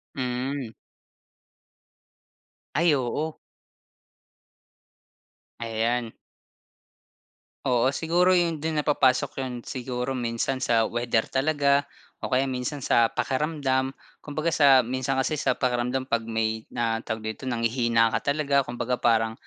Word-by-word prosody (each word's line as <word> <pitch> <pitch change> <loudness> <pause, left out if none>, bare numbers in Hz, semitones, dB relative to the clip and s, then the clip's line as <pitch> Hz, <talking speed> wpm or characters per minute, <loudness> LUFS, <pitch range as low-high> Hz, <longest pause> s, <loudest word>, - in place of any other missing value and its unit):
Hmm. 130 0 -3 2.1
Ay 165 +1 +4
oo. 145 +4 -2 2.2
Ayan. 115 +1 -1 1.5
Oo, 125 0 +3
siguro 175 +5 +2
'yon 165 -3 0
do'n 160 0 -2
na - - -25
papasok 135 -2 +2
'yon 130 -1 -4
siguro 125 0 -3
minsan 125 +1 -2
sa 115 -3 +3
weather 120 -1 0
talaga 140 0 +1 0.3
o - - -3
kaya 130 +1 +2
minsan 130 +2 -3
sa 115 -1 +4
pakiramdam. 135 -1 -1 0.3
Kumbaga 155 +3 -2
sa 135 -4 +6
minsan 130 +2 -1
kasi 150 +3 0
sa - - +1
pakiramdam 125 +1 0
'pag 115 -3 0
may 110 0 -2
na 115 -1 -1
tawag 110 -1 -5
dito, 130 +3 -7
nanghihina 115 -1 +2
ka - - -1
talaga. 140 -2 +2
Kumbaga 125 -1 -3
parang, 115 -1 +2
130 Hz, 115 wpm, -26 LUFS, 120-140 Hz, 2.2 s, sa